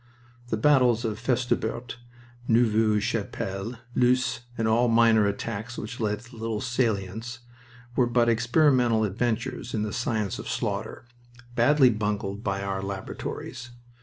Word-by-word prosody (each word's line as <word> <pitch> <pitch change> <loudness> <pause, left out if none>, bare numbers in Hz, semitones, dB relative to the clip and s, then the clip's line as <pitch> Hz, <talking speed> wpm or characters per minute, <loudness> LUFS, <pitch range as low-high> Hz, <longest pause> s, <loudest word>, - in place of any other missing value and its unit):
The 110 - -1
battles 125 -2 +4
of 110 -1 -2
Festubert, 120 0 -1 0.5
Neuve 110 -2 +3
Chapelle, 100 0 -3 0.2
Loos, 125 -1 +2 0.2
and 115 - 0
all 115 +2 +3
minor 115 -2 +5
attacks 105 +4 -4
which 120 +3 -6
led 105 -2 -1
to 120 +1 -15
little 110 -1 -2
salients, 115 -1 -2 0.5
were 125 - +3
but 120 0 +2
experimental 120 0 +3
adventures 115 +4 -2
in 105 - 0
the 105 - -3
science 110 -5 -1
of - - -6
slaughter, - - -3 0.5
badly 130 +2 +5
bungled 105 -2 -2
in - - -6
our 100 0 -2
laboratories. 100 +5 -6
115 Hz, 130 wpm, -26 LUFS, 105-120 Hz, 0.5 s, minor